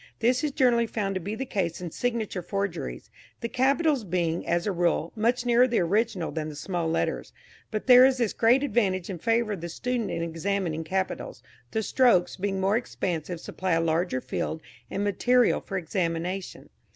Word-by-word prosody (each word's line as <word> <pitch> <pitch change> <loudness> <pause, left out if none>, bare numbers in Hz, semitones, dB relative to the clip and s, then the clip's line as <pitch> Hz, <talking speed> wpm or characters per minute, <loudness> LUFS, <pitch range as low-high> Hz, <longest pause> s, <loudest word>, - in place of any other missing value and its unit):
This 245 +5 +2
is 300 - +1
generally 245 -4 +3
found 200 -3 -2
to 185 - -3
be 205 +5 -4
the 265 - -4
case 185 -8 -2
in 175 -2 -6
signature 225 -5 -2
forgeries, 175 - -4 0.3
the 235 - -1
capitals 275 +3 +2
being, 170 -3 -1
as 170 0 +1
a 205 - +1
rule, 170 -2 0
much 235 +3 +1
nearer 245 +1 +5
the 240 - 0
original 200 0 0
than 155 -1 -3
the 150 - -8
small 170 +2 -2
letters. 165 - -1 0.4
But 215 -1 -3
there 250 0 +9
is 260 0 +5
this 235 -4 0
great 240 +4 +4
advantage 195 -9 0
in 180 - -6
favour 230 +3 +1
of 195 -5 -4
the 170 - -5
student 245 +5 -2
in 165 - -2
examining 170 0 -2
capitals 190 +4 -3 0.3
the 220 -1 -1
strokes 235 -7 +3
being 195 0 -2
more 195 +3 +2
expansive 175 -7 -3
supply 185 +1 -3
a 165 - +3
larger 165 -4 0
field 160 +5 -3 0.3
and 200 - -2
material 245 +5 +3
for 195 - -4
examination. 180 +1 -3
195 Hz, 185 wpm, -27 LUFS, 170-235 Hz, 0.4 s, there